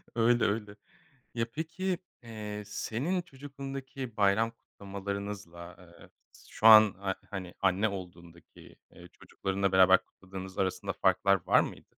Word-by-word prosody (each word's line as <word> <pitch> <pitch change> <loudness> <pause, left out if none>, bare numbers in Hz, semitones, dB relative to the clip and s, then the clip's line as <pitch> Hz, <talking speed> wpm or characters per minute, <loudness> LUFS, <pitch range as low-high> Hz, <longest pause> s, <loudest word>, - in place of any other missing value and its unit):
Öyle, 120 0 +3
öyle. 105 0 -2 0.6
Ya 115 0 0
peki, 170 +4 -3 0.3
eee, 105 -2 -7
senin 140 - -2
çocukluğundaki 135 -4 -8
bayram 105 +3 +3
kutlamalarınızla, 100 -4 -7
ııı, 85 -1 -17 0.4
şu 110 - +2
an, 110 -2 +9
a 95 -1 -1
hani, 95 -3 -6
anne 100 +3 +2
olduğundaki, 85 -3 -11 0.2
eee, 90 - -14
çocuklarınla 95 +2 -3
beraber 95 -1 +6
kutladığınız 95 0 -10
arasında 95 +1 -1
farklar 95 0 +2
var - - +6
mıydı? - - -7
100 Hz, 120 wpm, -30 LUFS, 95-115 Hz, 0.6 s, an